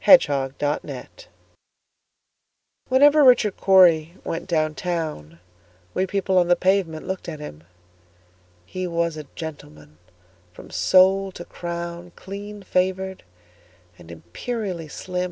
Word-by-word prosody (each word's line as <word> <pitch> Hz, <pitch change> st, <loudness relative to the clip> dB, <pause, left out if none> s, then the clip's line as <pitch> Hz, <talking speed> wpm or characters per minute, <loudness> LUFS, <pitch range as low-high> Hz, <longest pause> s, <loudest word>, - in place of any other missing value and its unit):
Richard 140 Hz, -, +5 dB
Cory 145 Hz, +1 st, -3 dB, 1.8 s
WHENEVER 290 Hz, +3 st, +6 dB
Richard 245 Hz, -6 st, +5 dB
Cory 175 Hz, -4 st, +5 dB
went 165 Hz, +1 st, -4 dB
down 155 Hz, -3 st, 0 dB
town, 155 Hz, -, -4 dB, 0.5 s
We 190 Hz, -, 0 dB
people 190 Hz, -1 st, +1 dB
on 175 Hz, -, +2 dB
the 175 Hz, -, +4 dB
pavement 185 Hz, -4 st, 0 dB
looked 190 Hz, -2 st, -4 dB
at 155 Hz, -2 st, -7 dB
him:He 90 Hz, -, -11 dB
was 170 Hz, -1 st, -1 dB
a 155 Hz, -1 st, -8 dB
gentleman 75 Hz, -, -10 dB, 0.5 s
from -, -, -13 dB
sole 190 Hz, +1 st, +4 dB
to 175 Hz, -, -9 dB
crown, 170 Hz, 0 st, -6 dB
Clean 205 Hz, +1 st, -9 dB
favored, 190 Hz, +1 st, -1 dB, 0.8 s
and 80 Hz, -, -14 dB
imperially 165 Hz, -, -5 dB
slim. 180 Hz, +5 st, -5 dB
170 Hz, 110 wpm, -23 LUFS, 135-190 Hz, 1.8 s, WHENEVER